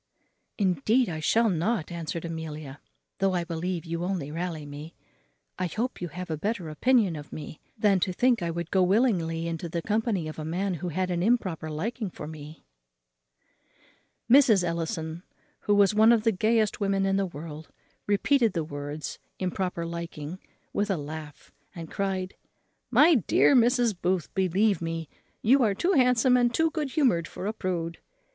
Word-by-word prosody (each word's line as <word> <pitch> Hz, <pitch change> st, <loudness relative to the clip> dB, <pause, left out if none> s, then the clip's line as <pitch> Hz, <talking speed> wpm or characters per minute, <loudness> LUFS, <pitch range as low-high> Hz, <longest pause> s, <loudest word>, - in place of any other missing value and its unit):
"Indeed 210 Hz, -, +2 dB
I 160 Hz, -2 st, -4 dB
shall 225 Hz, +9 st, +3 dB
not," 180 Hz, -1 st, 0 dB
answered 170 Hz, 0 st, -4 dB
Amelia, 155 Hz, -4 st, -6 dB, 0.4 s
"though 195 Hz, -1 st, +2 dB
I 175 Hz, -, 0 dB
believe 170 Hz, +1 st, -3 dB
you 170 Hz, +1 st, -3 dB
only 175 Hz, -6 st, -2 dB
rally 165 Hz, -2 st, -4 dB
me; 145 Hz, +3 st, -9 dB, 0.6 s
I 185 Hz, -, 0 dB
hope 230 Hz, +8 st, -3 dB
you 175 Hz, -, -2 dB
have 180 Hz, +1 st, -7 dB
a 155 Hz, -, -1 dB
better 195 Hz, -1 st, -2 dB
opinion 210 Hz, -, +2 dB
of 145 Hz, -1 st, -9 dB
me 150 Hz, 0 st, -8 dB, 0.2 s
than 205 Hz, -3 st, +3 dB
to 185 Hz, -, 0 dB
think 245 Hz, +3 st, +2 dB
I 170 Hz, -, -1 dB
would 170 Hz, 0 st, -4 dB
go 190 Hz, -, +3 dB
willingly 180 Hz, -5 st, +2 dB
into 165 Hz, 0 st, -4 dB
the 170 Hz, 0 st, -3 dB
company 215 Hz, -6 st, 0 dB
of 155 Hz, -, -7 dB
a -, -, -4 dB
man 180 Hz, +5 st, -1 dB
who 180 Hz, -, -3 dB
had 180 Hz, +3 st, -1 dB
an 175 Hz, -1 st, -1 dB
improper 185 Hz, -7 st, 0 dB
liking 210 Hz, +8 st, -3 dB
for 155 Hz, -, -8 dB
me." 155 Hz, 0 st, -10 dB, 1.6 s
Mrs. 240 Hz, -6 st, +6 dB
Ellison, 165 Hz, -1 st, -3 dB, 0.4 s
who 205 Hz, -, +1 dB
was 205 Hz, 0 st, +5 dB
one 220 Hz, +2 st, +6 dB
of 230 Hz, -2 st, +3 dB
the 225 Hz, -, +4 dB
gayest 215 Hz, +2 st, +1 dB
women 195 Hz, -1 st, +1 dB
in 195 Hz, 0 st, +2 dB
the 195 Hz, -1 st, 0 dB
world, 155 Hz, -1 st, -9 dB, 0.4 s
repeated 225 Hz, +2 st, +3 dB
the 165 Hz, -, -1 dB
words, 145 Hz, 0 st, -6 dB, 0.2 s
improper 180 Hz, -2 st, -2 dB
liking, 170 Hz, 0 st, -6 dB, 0.3 s
with 205 Hz, +1 st, 0 dB
a 195 Hz, -, +1 dB
laugh; 150 Hz, 0 st, -8 dB, 0.2 s
and 165 Hz, -2 st, -8 dB
cried, 190 Hz, -1 st, -2 dB, 0.6 s
"My 330 Hz, +3 st, +6 dB
dear 265 Hz, -, +4 dB
Mrs. 240 Hz, -1 st, +4 dB
Booth, 180 Hz, -2 st, 0 dB
believe 190 Hz, +2 st, +2 dB
me, 165 Hz, -2 st, -4 dB, 0.3 s
you 265 Hz, +5 st, +5 dB
are 210 Hz, -5 st, +2 dB
too 355 Hz, -, +1 dB
handsome 250 Hz, -4 st, +4 dB
and 240 Hz, -1 st, +3 dB
too 320 Hz, +5 st, +2 dB
good 305 Hz, -4 st, -2 dB
humoured 245 Hz, -, +2 dB
for -, -, -7 dB
a 210 Hz, -, -1 dB
prude. 170 Hz, -5 st, -3 dB
180 Hz, 170 wpm, -27 LUFS, 165-215 Hz, 1.6 s, Mrs